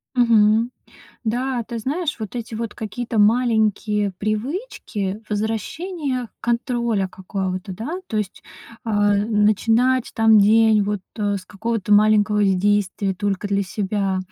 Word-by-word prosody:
Мгм, 230 -1 +4 0.5
да, 245 +2 -1
ты 230 +1 -6
знаешь, 300 +7 -2
вот 215 +1 -6
эти 230 -1 -5
вот 230 -1 -4
какие-то 225 +1 -4
маленькие 215 -2 +2
привычки 215 - -3
возвращения 250 - -3
контроля 235 -4 0
какого-то, 185 +1 -4
да. 270 - -5
То 220 - -3
есть, 210 -3 -3 0.4
а, 205 -2 +2
начинать, 225 +4 +2
там, 225 -1 +5
день 220 +1 +5
вот, 205 0 -2 0.2
э, 205 -1 0
с 185 - -8
какого-то 210 0 -2
маленького 210 0 +4
с 195 -1 +3
действия 200 0 0
только 200 +1 -2
для 200 0 0
себя, 195 0 -2
215 Hz, 125 wpm, -21 LUFS, 205-235 Hz, 0.5 s, там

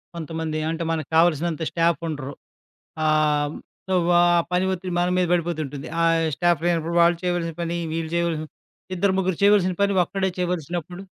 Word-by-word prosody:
కొంతమంది 160 -1 -4
అంటే, 165 +1 -3
మనకు 155 -3 -3
కావాల్సినంత 165 -1 +2
స్టాఫ్ 170 -2 +1
ఉండరు. 145 -3 -5 0.7
ఆహ్, 150 -1 +2 0.4
సో, 190 - +2 0.3
ఆ - - +5 0.3
పని 180 +1 +1
ఒత్తిడి 185 -1 -5
మన 175 0 +1
మీద 180 -1 +2
పడిపోతుంటుంది. 155 -5 -2 0.5
స్టాఫ్ 175 -1 +1
లేనప్పుడు 170 -1 0
వాళ్లు 170 0 +4
చేయవలసిన 175 -2 -1
పని, 170 0 -2 0.2
వీళ్లు 160 -1 -3
చేయవలసిన 170 -2 -1 0.5
ఇద్దరు 190 +2 +1
ముగ్గురు 185 -3 0
చేయవలసిన 200 -3 +4
పని 200 0 +3
ఒక్కడే 190 +1 -2
చేయవలసినప్పుడు 175 0 -3
170 Hz, 145 wpm, -23 LUFS, 155-180 Hz, 0.7 s, ఆ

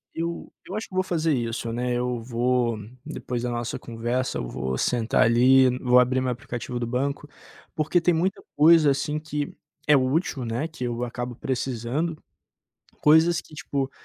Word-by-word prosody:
eu 170 +1 -4 0.2
eu 190 - -6
acho 215 - -5
que - - -19
vou 185 - +2
fazer 165 -4 0
isso, 115 -2 -2
né, 125 +1 -1
eu 120 -1 -2
vou, 120 -1 0 0.3
depois 125 -1 -4
da 125 - -1
nossa 120 -1 -3
conversa, 120 +2 -2
eu - - -3
vou 65 +1 -3
sentar 115 - +2
ali, 130 +3 +5
vou 125 -1 +5
abrir 130 +1 +2
meu 130 -1 0
aplicativo 120 0 -5
do 120 - -2
banco, 140 +4 -2 0.5
porque 155 +3 +2
tem 175 +1 +2
muita 180 +4 0
coisa, 155 -1 +6
assim, 150 +2 -1
que 150 -2 -4 0.3
é 150 - +6
útil, 135 - 0
né, 120 +8 -2
que 155 -6 -5
eu 120 0 -2
acabo 120 0 -4
precisando, 130 +6 -2 0.8
coisas 160 +3 +5
que - - -19
tipo, 140 -2 -3
130 Hz, 170 wpm, -25 LUFS, 120-155 Hz, 0.8 s, coisa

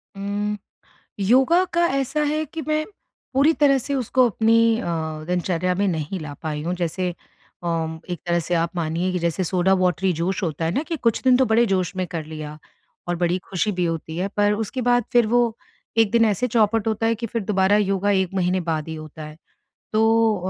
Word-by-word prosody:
उम, 205 +1 -2 0.6
योगा 265 - +4
का 345 0 +4
ऐसा 275 +3 0
है 305 +1 0
कि 320 +2 -7
मैं 310 0 +1 0.5
पूरी 280 +4 +5
तरह 280 -2 +4
से 280 +3 -3
उसको 255 0 +2
अपनी 225 +2 +3
अ, - - -6 0.4
दिनचर्या 180 0 0
में 200 +2 0
नहीं 165 +1 -3
ला 155 -2 -6
पाई 150 -2 -3
हूँ। 175 +2 -2
जैसे 180 +1 -2 0.5
अम, 160 -1 -2
एक 175 - -4
तरह 175 0 +2
से 175 +2 -2
आप 170 +1 -1
मानिए 170 +2 -1
कि 180 - -1
जैसे 170 +2 -1
सोडा 180 +2 +1
वाटरी 185 +1 +1
जोश 190 +3 -1
होता 160 -2 -2
है 160 - +1
ना 280 - +1
कि 330 +1 -4
कुछ 230 -6 +1
दिन 255 -1 +5
तो 260 - +4
बड़े 225 +2 +3
जोश 185 -2 0
में 185 -1 -1
कर 165 -3 -5
लिया 155 -1 -7 0.5
और 175 - 0
बड़ी 175 +1 +1
खुशी 195 +3 0
भी 180 -2 -1
होती 165 -1 -3
है, 185 +3 -1
पर 205 0 +1
उसके 225 +4 -3
बाद 245 -1 +3
फिर 240 -2 +4
वो 235 0 +2 0.4
एक 220 -3 +4
दिन 230 -1 +4
ऐसे 215 +3 +1
चौपट 225 -1 +2
होता 220 +1 0
है 230 - +2
कि 230 +1 -5
फिर 230 0 -3
दोबारा 190 0 +3
योगा 200 -1 +1
1 190 -1 +1
महीने 185 0 +1
बाद 155 -1 -2
ही 160 - -4
होता 155 0 -9
है। 155 0 -10 0.6
तो 225 0 +3
195 Hz, 210 wpm, -22 LUFS, 175-230 Hz, 0.6 s, पूरी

